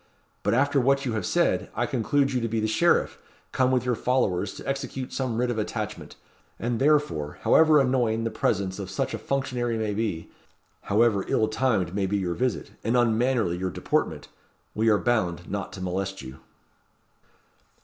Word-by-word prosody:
But 105 +3 +1
after 140 +1 +3
what 135 +2 +2
you 120 - -1
have 105 -5 -2
said, - - +1
I - - 0
conclude 135 +3 +1
you 125 - 0
to 115 - -1
be 115 0 -1
the 110 - 0
sheriff, 170 +11 +2 0.3
come 130 -1 +2
with 130 -1 +1
your 125 - +1
followers 105 -6 0
to - - -9
execute 135 -1 -4
some 130 -4 -2
writ 125 0 +1
of 110 - -2
attachment; 105 - -5 0.4
and 120 0 -2
therefore, 140 - +1
however 155 -2 +5
annoying 125 -4 +1
the 115 - -2
presence 100 -3 -1
of 95 -2 -5
such 95 - -2
a - - -3
functionary 125 -4 -1
may 110 -2 -1
be, 100 -6 -3 0.5
however 105 -1 +3
ill 110 - +2
timed 110 -7 0
may 100 -1 0
be 100 +2 0
your 90 -3 -1
visit, 125 +4 -2
and 115 +3 +1
unmannerly 120 -5 +2
your 95 0 -1
deportment, - - -2 0.5
we 110 +1 +2
are 105 - +5
bound 90 -8 0
not 100 0 -3
to 95 - -8
molest 95 -1 -3
you." 65 +1 -10
115 Hz, 180 wpm, -26 LUFS, 100-130 Hz, 0.5 s, however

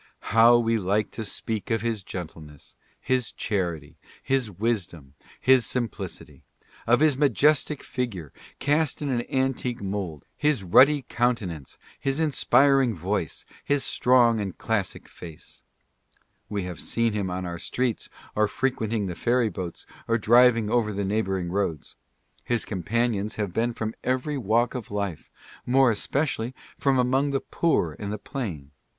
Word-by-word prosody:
How 115 +1 +7
we 115 -1 +1
like 100 +2 0
to 110 - -5
speak 110 +1 -4
of 115 -2 +1
his 115 -3 -1
gentleness, 80 -6 -9 0.2
his 125 -2 0
charity, 85 -8 -3 0.3
his 130 -4 0
wisdom, 95 - -3 0.3
his 130 -1 +5
simplicity! 120 -4 -4 0.2
— - - -26
of 120 +4 +4
his 155 -3 +4
majestic 145 +2 +2
figure, 100 - -4 0.2
cast 150 0 +1
in 145 - -2
an 120 -3 +1
an 130 +2 0
tique 120 -1 -4
mould, 95 -7 -4
his 150 -8 +1
ruddy 135 +10 +5
countenance, 105 - -2 0.2
his 135 +2 -1
inspiring 135 -5 +3
voice, 90 -1 -3 0.2
his 145 -1 +1
strong 120 -2 +4
and 100 -3 -4
classic 110 -5 -2
face! 80 -3 -12 0.9
We 100 -2 -2
have 90 -2 -6
seen 115 -1 0
him 100 -3 -2
on 90 +1 -3
our 85 -1 -5
streets, 125 +3 -2 0.3
or 105 0 +3
frequenting 115 -4 -1
the 90 - -3
ferry 120 +4 +1
boats, 90 -2 -6 0.2
or 115 - +2
driving 115 0 +5
over 115 -3 +2
the 100 0 -2
neighboring 95 -4 -1
roads. 90 -6 -2 0.5
His 120 -2 -1
companions 110 +1 -1
have 100 -5 -3
been 115 +4 +1
from 110 -1 -3
every 130 +4 -1
walk 115 +2 +1
of 125 -4 -6
life 100 -5 -4 0.2
— - - -18
more 130 0 +5
especially 125 +1 -1 0.2
from 135 -2 +1
among 130 +3 +2
the 140 -1 0
poor 90 - 0
and 100 -1 -4
the 105 - -3
plain. 95 - -6
115 Hz, 150 wpm, -25 LUFS, 95-125 Hz, 0.9 s, How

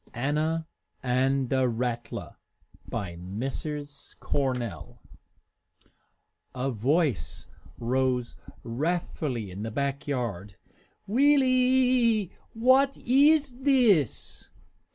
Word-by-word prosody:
ANNA 155 +6 0 0.4
AND 130 +1 +1
THE 130 -2 +2
RATTLER 120 -1 -4 0.5
By 85 -4 -4
Mrs. 135 - -5
Cornell 125 -5 -3 1.6
A 130 +2 -1
voice 135 - 0 0.3
rose 125 0 0 0.3
wrathfully 130 - -2
in 95 +3 -7
the 110 - -3
back 140 +4 -3
yard, 105 -8 -3 0.5
"Wee 280 +8 +4
lie! 255 -5 +3 0.2
What 260 +4 +4
iss 285 +3 +4
this? 245 - +2
140 Hz, 80 wpm, -27 LUFS, -, 1.6 s, Wee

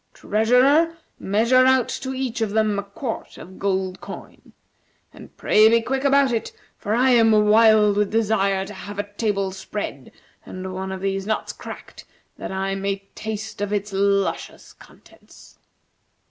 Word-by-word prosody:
Treasurer, 260 +10 +3 0.2
measure 235 +6 +3
out 260 -2 +3
to 265 - -5
each 260 -3 -3
of 220 - 0
them 215 -1 +1
a - - -1
quart 205 +4 -7
of 185 +2 -12
gold 190 -1 -2
coin. - - -11 0.6
And - - -15
pray 215 +1 +5
be 230 +1 +4
quick 265 +4 -3
about 280 -1 +3
it, 230 -2 -2 0.2
for 210 +2 -2
I 255 +2 +3
am 230 -2 +5
wild 215 -1 +5
with 210 -1 +1
desire 200 -3 +1
to 210 - -9
have 205 +1 -9
a 205 - -3
table 205 -3 -1
spread, 190 -8 -6 0.3
and 185 0 -7
one 190 +1 -5
of 190 -1 -6
these 195 0 -2
nuts 220 - -2
cracked, - - -11 0.3
that - - -6
I 195 0 -2
may 195 0 -4
taste 215 -1 -6
of 205 0 -2
its 205 0 -2
luscious 200 0 -1
contents." - - -19
210 Hz, 160 wpm, -22 LUFS, 195-230 Hz, 0.6 s, pray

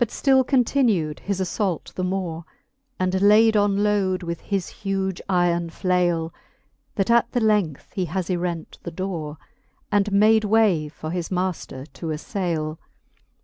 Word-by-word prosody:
But 235 - -3
ftill 265 -1 +3
continu'd 240 - +1
his 200 -1 -3
aflault 190 -2 -2
the 185 - -3
more, 180 -3 -2 0.6
And 185 +1 0
layd 215 +2 +6
on 205 -1 +2
load 195 -3 +1
with 170 -1 -4
his 195 -3 -2
huge 195 -2 -3
yron 175 -2 +1
flaile, 175 -2 0 0.6
That 195 +2 +1
at 235 0 +3
the 245 - +2
length 210 - 0
he 185 - -1
has 175 +1 -3
yrent 175 -3 -3
the - - -6
dore, 165 -4 -5 0.5
And 205 0 +2
made 215 +2 +5
way 205 -8 +3
for 155 +1 -7
his 175 -1 -3
maifter 180 -7 -3
to 165 - -7
aflaile. 160 -1 -3
185 Hz, 145 wpm, -23 LUFS, 170-205 Hz, 0.6 s, layd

